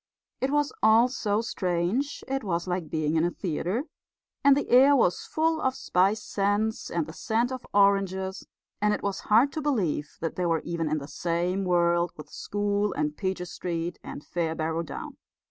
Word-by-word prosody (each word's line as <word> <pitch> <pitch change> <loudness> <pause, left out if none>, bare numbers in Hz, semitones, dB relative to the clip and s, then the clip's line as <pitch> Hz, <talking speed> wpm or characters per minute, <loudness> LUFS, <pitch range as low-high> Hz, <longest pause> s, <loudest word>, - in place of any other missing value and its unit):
It 265 - 0
was 295 0 +1
all 225 +3 +6
so 215 -4 0
strange, 195 +6 -1
it 270 -1 -2
was 175 -3 -2
like 180 -3 -2
being 155 0 0
in 160 - +3
a 175 - +2
theatre, 180 - -2 0.6
and 280 0 +6
the 285 - -1
air 270 +4 +7
was 180 -9 +1
full 320 0 +1
of 260 0 +1
spice 195 +2 +1
scents 205 +2 -1
and 170 -2 -1
the 160 - -9
scent 230 +6 0
of 260 -1 -6
oranges; 195 -1 +2 0.3
and 210 0 +3
it - - -8
was 200 -1 -2
hard 235 +7 +5
to 315 - -4
believe 195 - -1
that 165 - -4
they 180 - 0
were 165 -2 +1
even 165 -2 -2
in 155 - 0
the 140 -1 -6
same 175 +5 -1
world 175 -1 +2
with 150 - -11
school 205 0 -1
and 150 0 -1
Peter 185 0 -2
Street 170 -1 -4
and 145 - -8
Fairbarrow 160 -1 -2
Down. 170 - -7
190 Hz, 180 wpm, -27 LUFS, 170-225 Hz, 0.6 s, air